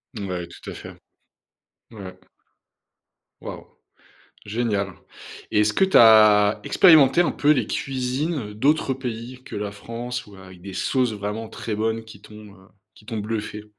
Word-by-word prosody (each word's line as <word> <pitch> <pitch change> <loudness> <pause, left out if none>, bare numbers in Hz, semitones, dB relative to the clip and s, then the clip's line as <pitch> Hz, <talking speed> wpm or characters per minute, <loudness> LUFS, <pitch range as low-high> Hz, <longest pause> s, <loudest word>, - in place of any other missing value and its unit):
Ouais, 90 -4 -5
tout - - -11
à - - -7
fait. - - -10 1.0
Ouais. 95 -4 -10 1.2
Waouh. - - -8 0.8
Génial 105 -3 -2 0.6
et 105 - +2
est-ce 105 0 +1
que - - +2
tu 190 - +3
as 110 -2 +6
expérimenté 160 -3 +5
un 170 - +1
peu 145 - 0
les 125 -7 +2
cuisines 130 -2 -3
d'autres 135 +4 +1
pays 125 0 -7
que - - -9
la 100 0 -4
France 120 +3 -6
ou 100 - -14
avec 95 -2 -14
des 95 0 -9
sauces 125 -4 0
vraiment 105 +2 -5
très 110 - -6
bonnes 110 +1 -2
qui 105 -2 -14
t'ont, 105 -1 -14
heu, 95 -1 -20 0.3
qui 105 - -21
t'ont 115 -2 -4
bluffé? 105 0 -5
110 Hz, 150 wpm, -23 LUFS, 105-125 Hz, 1.2 s, as